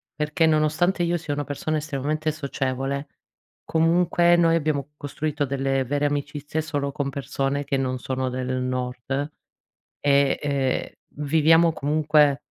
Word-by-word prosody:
perché 150 +2 +1
nonostante 155 +4 +2
io 170 0 +1
sia 160 -3 -4
una 145 -1 -3
persona 155 +2 -2
estremamente 155 +1 -2
socievole 140 -1 -3 0.6
comunque 170 +1 +3
noi 165 -1 +4
abbiamo 150 -3 -1
costruito 145 +1 -2
delle 135 0 0
vere 145 +3 0
amicizie 145 +1 -2
solo 145 -2 -2
con 140 0 -2
persone 140 0 -2
che 135 - 0
non 130 -1 -1
sono 130 0 -2
del 130 0 -2
nord, 125 +3 -3 0.7
e, 140 -1 +3
ehm, 140 -3 0 0.4
viviamo 160 +2 +5
comunque 150 -1 +2
145 Hz, 130 wpm, -24 LUFS, 135-155 Hz, 0.7 s, viviamo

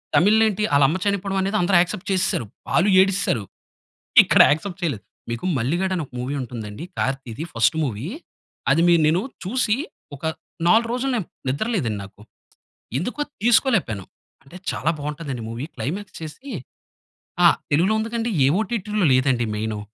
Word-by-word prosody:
తమిళ్‌లో 205 +9 +5
ఏంటి 210 +1 -2
ఆళ్ళమ్మ 140 +5 +4
చనిపోవడమనేది 195 0 0
అందరు 175 +1 +4
యాక్సెప్ట్ 180 +2 -3
చేసేసారు. 185 -10 0 0.2
వాళ్ళు 185 +4 +3
ఏడిస్సారు. 195 - +1 0.8
ఇక్కడ - - +5
యాక్సెప్ట్ 175 +5 -2
చేయలేదు. 140 -12 -2 0.3
మీకు 115 +6 -4
'మల్లిగాడు' 175 +10 0
అని 170 - -2
ఒక - - -36
మూవీ 130 +4 -3
ఉంటుందండి 110 -1 -7
'కార్తిది' 135 +1 -3
ఫస్ట్ 115 +5 +3
మూవీ. 120 -1 -3 0.6
అది 165 - +4
మి 175 - +6
నేను 165 +4 +2 0.2
చూసి 215 +2 +1 0.4
ఒక 140 - -17 0.4
4 225 +5 +5
రోజులు 260 +2 -1
నేను 215 -8 -2 0.2
నిద్ర 140 - -1
లేదండి 115 - -1
నాకు. 100 +1 -17 0.8
ఎందుకో 245 - -3 0.2
తీసుకోలేపోయాను. 220 - +2 0.4
అంటే 135 +6 -12
చాలా 160 - -1
బావుంటాదండి 145 -4 -5
మూవీ. 115 +4 -5
క్లైమాక్స్ 190 +7 -5
చేసీ 160 - -8 1.0
ఆ! - - +9 0.3
తెలుగులో 180 +9 +3
ఉందికండి. 230 +1 -2
ఏ - - +6
ఒటిటిలో 210 -3 -1
లేదండి 130 -2 +2
మెయిను. 110 0 -3
170 Hz, 140 wpm, -22 LUFS, 130-205 Hz, 1.0 s, ఆ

